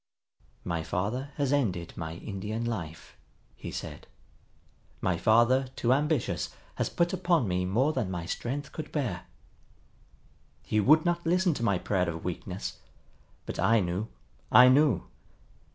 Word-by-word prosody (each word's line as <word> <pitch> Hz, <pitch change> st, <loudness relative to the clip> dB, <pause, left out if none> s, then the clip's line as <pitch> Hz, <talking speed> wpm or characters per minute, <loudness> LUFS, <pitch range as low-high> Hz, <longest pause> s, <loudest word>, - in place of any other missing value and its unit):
"My 85 Hz, -2 st, -2 dB
father 105 Hz, -, -2 dB
has 140 Hz, -2 st, 0 dB
ended 95 Hz, -12 st, 0 dB
my 80 Hz, -1 st, -5 dB
Indian 105 Hz, +5 st, -4 dB
life," 85 Hz, -9 st, -5 dB, 0.4 s
he -, -, -7 dB
said. -, -, -7 dB, 0.9 s
"My -, -, +1 dB
father, 120 Hz, +4 st, +4 dB
too 120 Hz, +1 st, +2 dB
ambitious, 150 Hz, -1 st, 0 dB, 0.2 s
has -, -, -1 dB
put 170 Hz, +1 st, 0 dB
upon 175 Hz, -, +2 dB
me 90 Hz, 0 st, 0 dB
more 125 Hz, +11 st, +2 dB
than 125 Hz, -9 st, -1 dB
my 85 Hz, -2 st, -4 dB
strength 135 Hz, +10 st, -4 dB
could 155 Hz, -, -7 dB
bear. 120 Hz, -, -3 dB, 1.4 s
He 110 Hz, -, 0 dB
would 155 Hz, -, +5 dB
not 175 Hz, 0 st, +1 dB
listen 180 Hz, +1 st, +2 dB
to 120 Hz, -, -4 dB
my 100 Hz, -5 st, +2 dB
prayer 90 Hz, 0 st, 0 dB
of 80 Hz, 0 st, -6 dB
weakness. 90 Hz, +1 st, -5 dB, 0.7 s
But -, -, -6 dB
I 115 Hz, 0 st, +4 dB
knew, 90 Hz, +3 st, -2 dB, 0.4 s
I 125 Hz, +1 st, +9 dB
knew! 145 Hz, +2 st, +4 dB
115 Hz, 140 wpm, -29 LUFS, 90-145 Hz, 1.4 s, I